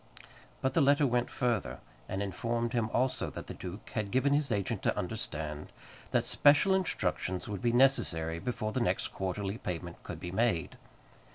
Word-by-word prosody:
But 130 0 +1
the 165 - +4
letter 145 +1 +5
went 125 -1 +1
further, 105 - -1 0.3
and 95 +2 -1
informed 115 +5 -2
him 115 -2 +1
also 130 +1 +1
that - - -7
the - - -7
duke 95 +3 -8
had 105 -3 -1
given 130 +5 +2
his 145 -2 +1
agent 100 -3 -1
to - - 0
understand 75 -1 -4 0.4
that - - +1
special 150 +7 +5
instructions 165 - 0
would 100 -3 -4
be 120 - +2
necessary 85 -11 +3
before 110 0 -2
the - - -1
next - - +1
quarterly 95 +3 -3
payment 85 -1 -5
could 80 - -7
be 90 0 -5
made. 95 -6 +1
110 Hz, 170 wpm, -31 LUFS, 90-130 Hz, 0.4 s, letter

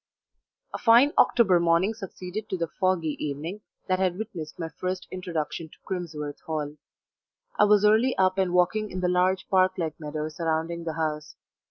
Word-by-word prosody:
A - - -4
FINE 245 +5 +6
October 195 -7 +5
morning 170 +5 +2
succeeded 195 -1 -7
to 190 - -2
the 170 - 0
foggy 175 -5 0
evening 155 +8 -4 0.3
that 185 0 +1
had 185 -2 +1
witnessed 185 -8 -6
my 165 -2 -4
first 185 0 -3
introduction 165 -3 -4
to - - -18
Crimsworth 155 -6 -5
Hall. 150 -2 -3 0.8
I 210 - +7
was 210 0 +4
early 220 +5 +4
up 185 0 +2
and 185 -2 +1
walking 180 +4 +2
in 185 -1 -5
the 180 - +1
large 185 +1 +1
park 185 -1 +3
like 160 -3 -3
meadow 155 0 -4
surrounding 165 +1 -2
the 160 - -2
house. 155 -1 -3
180 Hz, 170 wpm, -26 LUFS, 160-190 Hz, 0.8 s, I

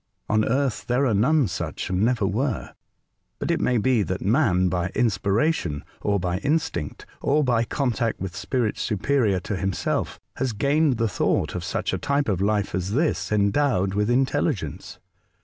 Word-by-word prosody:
On 110 0 +2
Earth 130 0 0
there 125 +3 +2
are 120 - +2
none 130 +6 +3
such, 85 -1 -4
and 90 0 0
never 115 -2 +2
were; 115 +5 -2 0.6
but - - -2
it - - 0
may 125 - +2
be 120 +1 +2
that 95 -2 -2
man, 100 -5 +3
by 90 -1 0
inspiration, 100 - +1 0.2
or 100 -1 +1
by 90 0 -1
instinct, 120 - -2 0.2
or 150 +2 +2
by 120 -3 +2
contact 120 -3 -1
with 95 -2 -5
spirits 115 +3 -1
superior 105 -2 +1
to 105 - -3
himself, 95 -1 -2 0.2
has 130 -3 -1
gained 140 +3 +2
the 115 0 +1
thought 100 - 0
of - - -4
such - - -2
a - - -1
type 140 -2 0
of 95 -3 0
life 105 0 0
as 95 +1 -2
this 150 -1 0
endowed 100 -1 +2
with 105 +2 0
intelligence. 135 - -1
110 Hz, 165 wpm, -24 LUFS, 95-135 Hz, 0.6 s, none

